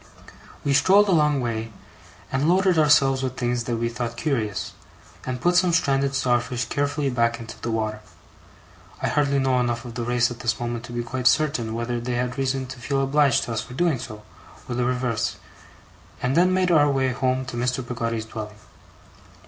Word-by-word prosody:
We 140 - +1
strolled 195 +8 +5
a - - +4
long 150 -5 +3
way, 115 -2 -3 0.6
and 135 +4 +1
loaded 185 -1 +3
ourselves 135 -3 +4
with 130 0 -3
things 120 -1 -1
that 120 -2 -1
we 115 +1 -1
thought 115 0 -4
curious, 120 -8 -2 0.5
and 125 -1 -3
put 175 +8 +2
some 180 0 +4
stranded 140 -4 +1
starfish 125 -1 0
carefully 145 -1 -1
back 115 -1 +1
into 115 -1 -10
the 120 - -3
water 110 -1 -2 1.0
I - - -1
hardly 140 -1 +1
know 130 -2 +2
enough 120 0 -1
of 120 - -7
the 120 - -4
race 120 0 +1
at 120 - -8
this 120 +1 -1
moment 120 -1 -4
to - - -10
be 120 0 -3
quite 125 +1 -1
certain 125 -7 +2
whether 120 +1 -2
they 120 +1 -3
had 125 +2 -2
reason 135 0 0
to 130 -1 -8
feel 135 +4 -1
obliged 140 -1 +3
to 115 - -4
us 110 - -1
for 125 +3 -10
doing 165 -4 +1
so, 105 -2 -8 0.4
or 125 - -4
the 120 0 0
reverse 125 -3 -1 0.8
and 125 +2 0
then 180 +2 +4
made 185 -1 +2
our 145 -3 +5
way 135 -1 +1
home 130 +1 0
to 120 - -7
Mr. 125 +1 -1
Peggotty's 115 -2 -3
dwelling. 110 -2 -7
125 Hz, 195 wpm, -24 LUFS, 120-140 Hz, 1.0 s, strolled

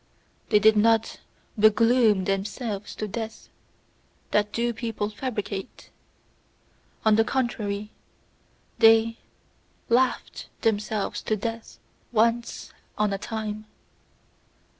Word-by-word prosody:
They 210 - +5
did 220 +1 +5
not 225 +1 +2 0.4
"begloom" 215 -2 +4
themselves 200 +2 -3
to 215 - -4
death 225 +2 -6 0.8
that 210 0 +2
do 235 0 -1
people 220 -2 -3
fabricate! 210 -3 -5 1.1
On 215 -1 +5
the 225 - +5
contrary, 215 -5 -2 0.9
they 225 0 +5 0.7
LAUGHED 250 +2 +1
themselves 215 -2 -1
to 215 - 0
death 225 +2 -5 0.3
once 235 +1 0 0.2
on 210 -1 +1
a 195 - -3
time! 215 -1 -5
220 Hz, 95 wpm, -25 LUFS, 210-230 Hz, 1.1 s, They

